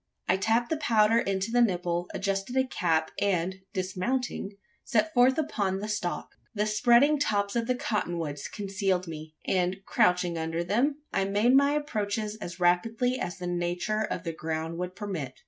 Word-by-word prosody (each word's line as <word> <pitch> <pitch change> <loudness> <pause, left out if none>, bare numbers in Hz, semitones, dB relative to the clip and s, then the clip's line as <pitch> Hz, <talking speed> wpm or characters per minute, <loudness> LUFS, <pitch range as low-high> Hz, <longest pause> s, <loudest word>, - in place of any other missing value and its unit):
I 185 - +4
tapped 225 +6 +1
the 320 - +1
powder 225 -5 +4
into 195 0 -1
the 245 +1 +4
nipple; 175 -5 0
adjusted 195 +5 -2
a 260 - +4
cap; 165 -10 0
and, 190 -2 +1
dismounting, 195 +4 -2 0.3
set 270 +6 +1
forth 250 +2 +5
upon 205 -11 0
the 205 +2 -4
stalk. 205 -5 -3 0.2
The 210 0 +1
spreading 240 +7 +4
tops 205 -7 0
of 230 -1 0
the 255 - +1
cotton 210 -7 -2
woods 145 -4 -4
concealed 195 -2 -1
me; 155 -1 -8
and, 185 +1 0
crouching 180 -2 +2
under 165 +1 -2
them, 270 - 0
I 195 - +1
made 205 +5 +3
my 280 +1 +5
approaches 215 -7 -2
as 175 -4 -7
rapidly 225 +8 +2
as 175 - -4
the 180 - -6
nature 175 +4 -1
of 185 -5 -3
the 165 -2 -3
ground 160 +1 -4
would 180 0 -4
permit. 170 -11 -5
195 Hz, 170 wpm, -28 LUFS, 175-230 Hz, 0.3 s, forth